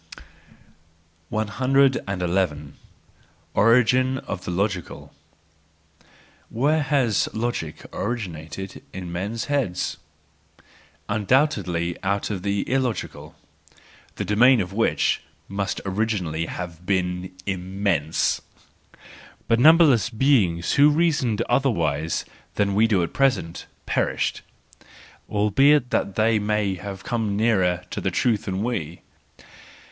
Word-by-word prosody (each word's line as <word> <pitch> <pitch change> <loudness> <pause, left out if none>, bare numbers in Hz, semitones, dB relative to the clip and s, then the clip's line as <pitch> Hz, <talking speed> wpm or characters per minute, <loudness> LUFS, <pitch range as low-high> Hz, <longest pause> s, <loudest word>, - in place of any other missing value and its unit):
hi. 130 +6 +2 1.6
Origin 125 +4 +3
of 95 -7 -6
the - - -4
Logical 95 0 -3 1.4
'—Where 150 +7 +1
has 135 -7 +1
logic 110 -9 -3
origin¬ 105 -5 -3
ated 80 +5 -8
in 90 -2 -6
men's 100 +6 -3
heads? 135 -11 -1 1.1
Undoubtedly 100 - +1
out 100 +2 -1
of 95 -3 -3
the 100 +1 -1
illogical, 130 -3 -2 0.8
the - - -3
domain 120 +4 +5
of 95 -1 -3
which 115 +2 +1 0.3
must 100 0 -3
originally 95 -6 -1
have 90 -1 -7
been 90 -1 -1
immense. 95 -4 -1 1.1
But 115 - +3
numberless 150 - +6
beings 110 -9 +2
who 145 +1 +6
reasoned 150 -8 +1
otherwise 85 - 0 0.3
than 100 -1 +1
we 110 +3 +4
do 100 -6 +2
at 85 - -4
present, 130 -12 0 0.2
perished; - - -1 0.9
albeit 125 +6 +3
that 100 - -1
they 110 0 +3
may 105 -1 0
have 95 0 -7
come 110 -4 -1
nearer 95 -5 +1
to - - -4
truth 110 +3 0
than 95 0 -2
we! 90 -9 -4
105 Hz, 100 wpm, -23 LUFS, 90-125 Hz, 1.6 s, numberless